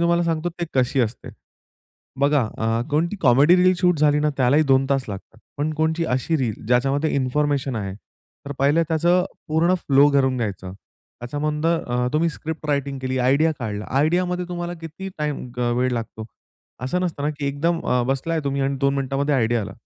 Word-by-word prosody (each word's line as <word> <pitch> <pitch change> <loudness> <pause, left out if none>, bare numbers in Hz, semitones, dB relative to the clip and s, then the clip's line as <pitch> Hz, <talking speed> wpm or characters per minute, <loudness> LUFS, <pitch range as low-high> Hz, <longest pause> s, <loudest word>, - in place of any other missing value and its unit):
तुम्हाला 170 0 +3
सांगतो 165 0 -1
ती 175 0 -5
कशी 130 +1 +2
असते? 120 0 -3 0.9
बघा 140 0 +3 0.2
अ, 115 +1 0
कोणती 165 +7 0
कॉमेडी 140 +6 +5
रील 185 0 +4
शूट 180 -3 +2
झाली 150 0 +3
ना 150 0 +2
त्यालाही 135 +4 +4
2 135 0 +4
तास 135 -2 +1
लागतात. 100 +2 -8 0.2
पण 150 +2 -1
कोणती 160 +2 0
अशी 130 +6 0
रील 125 -7 -1
ज्याच्यामध्ये 135 +6 +1
इन्फॉर्मेशन 140 0 0
आहे, 100 -3 -4 0.5
तर 145 - -4
पाहिलं 145 +4 +3
त्याचं 175 +3 +2 0.2
पूर्ण 165 +4 +2
फ्लो 140 -5 +4
करून 130 -2 +2
घ्यायचं. 95 -5 -4 0.5
त्याच्यामधून 150 +5 -3
अ, 125 -7 0
तुम्ही 160 +2 +2
स्क्रिप्ट 160 0 -6
रायटिंग 140 -1 -1
केली, 130 0 -2
आयडिया 140 +6 +3
काढला, 105 -3 -4
आयडियामध्ये 180 +4 +1
तुम्हाला 175 0 -4
किती 165 +4 -7
टाईम 150 -3 -3
अ, 120 -1 +1
वेळ 130 0 +1
लागतो? 110 -2 -5 0.6
असं 180 +8 -1
नसतं 170 -5 -3
ना, 150 - +1
की 145 - -2
एकदम 165 +5 0
अ, 125 -1 +2
बसलाय 155 +5 -1
तुम्ही 140 0 -1
आणि 135 0 0
2 140 0 +2
मिनिटामध्ये 140 +1 -1
आयडिया 120 -2 +1
आला. 100 -1 -6
140 Hz, 180 wpm, -22 LUFS, 130-160 Hz, 0.9 s, कॉमेडी